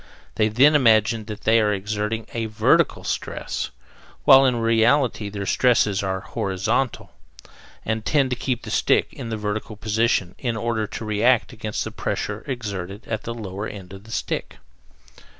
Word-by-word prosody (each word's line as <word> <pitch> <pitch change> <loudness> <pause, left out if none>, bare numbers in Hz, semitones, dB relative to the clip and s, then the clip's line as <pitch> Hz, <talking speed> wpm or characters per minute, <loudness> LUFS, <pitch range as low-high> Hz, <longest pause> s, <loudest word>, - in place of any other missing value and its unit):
They 110 - +2
then 130 +8 +5
imagine 110 -5 +3
that 105 -1 -7
they 115 +1 +4
are 105 -1 +2
exerting 105 +2 -2
a 115 -1 -2
VERTICAL 110 -1 +2
stress, - - -3 0.6
while 135 0 +8
in 125 - +2
reality 115 0 +2
their 100 -1 -5
stresses 105 -4 +2
are 95 -1 -2
HORIZONTAL 110 +4 -2 0.7
and 110 0 -1
tend 135 +1 +2
to - - +1
keep 125 0 -2
the - - -7
stick - - +2
in 115 - -7
a 110 - -2
vertical 105 +1 -4
position 110 -3 0
in 120 -3 -2
order 110 -1 -1
to 110 - -6
react 110 +4 +2
against 110 -2 -3
the - - -6
pressure 105 +1 -3
exerted 100 -6 -5
at 110 -2 -4
the 115 - -3
lower 100 -2 -5
end 95 -2 -9
of 95 +2 -11
the 110 - -12
stick. - - -3
110 Hz, 165 wpm, -23 LUFS, 105-115 Hz, 0.7 s, while